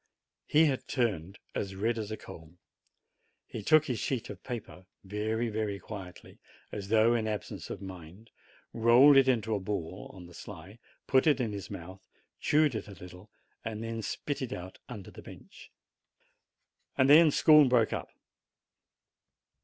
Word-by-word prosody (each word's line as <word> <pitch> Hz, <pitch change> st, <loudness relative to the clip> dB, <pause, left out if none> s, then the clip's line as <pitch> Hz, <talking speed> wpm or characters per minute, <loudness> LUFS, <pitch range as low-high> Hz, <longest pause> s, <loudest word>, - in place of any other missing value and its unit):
He 155 Hz, +2 st, +5 dB
had 135 Hz, -4 st, -1 dB
turned 100 Hz, -, -1 dB, 0.2 s
as 95 Hz, -1 st, -4 dB
red 115 Hz, +4 st, -1 dB
as 105 Hz, -2 st, -4 dB
a 110 Hz, -, -4 dB
coal. 80 Hz, +1 st, -13 dB, 0.9 s
He 110 Hz, -, -7 dB
took 155 Hz, +8 st, +4 dB
his 125 Hz, -5 st, -2 dB
sheet 130 Hz, -4 st, -3 dB
of -, -, -11 dB
paper 110 Hz, -7 st, -8 dB, 0.2 s
very, 110 Hz, +4 st, -2 dB
very 105 Hz, -2 st, -2 dB
quietly, 95 Hz, -4 st, -10 dB, 0.3 s
as 100 Hz, -2 st, -6 dB
though 110 Hz, +1 st, +4 dB
in 115 Hz, -2 st, 0 dB
absence 105 Hz, -3 st, -5 dB
of -, -, -7 dB
mind, 95 Hz, +3 st, -11 dB, 0.4 s
rolled 120 Hz, +5 st, +6 dB
tt -, -, -11 dB
into 110 Hz, -4 st, +1 dB
a 105 Hz, -, 0 dB
ball, 95 Hz, -2 st, -5 dB
on 90 Hz, -2 st, -12 dB
the 85 Hz, -, -14 dB
sly, 95 Hz, +5 st, -11 dB, 0.3 s
put 130 Hz, +2 st, +3 dB
it 145 Hz, -3 st, +4 dB
into 115 Hz, -4 st, -1 dB
his 100 Hz, -2 st, -7 dB
mouth, 95 Hz, +3 st, -9 dB, 0.4 s
chewed 150 Hz, -2 st, +3 dB
it 110 Hz, -, -5 dB
a 100 Hz, -, -10 dB
little, 90 Hz, +3 st, -13 dB, 0.3 s
and 110 Hz, -1 st, -5 dB
then 115 Hz, 0 st, -4 dB
spit 145 Hz, +6 st, -4 dB
it 130 Hz, -1 st, -3 dB
out 90 Hz, +1 st, -8 dB
under 105 Hz, -6 st, -8 dB
the -, -, -12 dB
bench. -, -, -14 dB, 1.3 s
Then 150 Hz, +5 st, +7 dB
school 150 Hz, -1 st, +6 dB
broke 120 Hz, -3 st, +3 dB
up. -, -, -4 dB
110 Hz, 160 wpm, -30 LUFS, 95-125 Hz, 1.3 s, Then